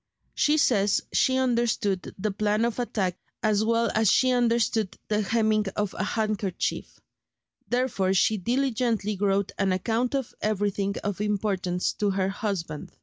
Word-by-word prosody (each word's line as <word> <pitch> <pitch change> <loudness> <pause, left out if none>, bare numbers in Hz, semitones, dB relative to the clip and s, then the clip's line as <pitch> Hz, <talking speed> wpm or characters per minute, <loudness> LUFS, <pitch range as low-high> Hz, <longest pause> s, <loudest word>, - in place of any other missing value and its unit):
She 300 +1 +2
says 205 -8 +3
she 260 0 +3
understood 235 -6 0
the 210 +2 -1
plan 210 +2 +1
of 235 +1 -2
attack 190 -7 -1 0.3
as 215 -1 +2
well 230 +1 +1
as 220 -2 +3
she 255 -1 +4
understood 230 -4 +1
the 210 0 +1
hemming 215 0 +1
of 210 -2 -1
a - - -3
handkerchief; 215 -4 -2 0.7
therefore 230 -7 0
she 215 +3 +3
diligently 235 -1 0
wrote 195 0 0
an 195 -1 +2
account 230 +7 0
of 270 -4 -3
everything 205 -1 -1
of 205 -1 -3
importance 195 -4 -1
to 205 - 0
her 190 -1 0
husband. 195 -7 -4
210 Hz, 145 wpm, -26 LUFS, 195-235 Hz, 0.7 s, she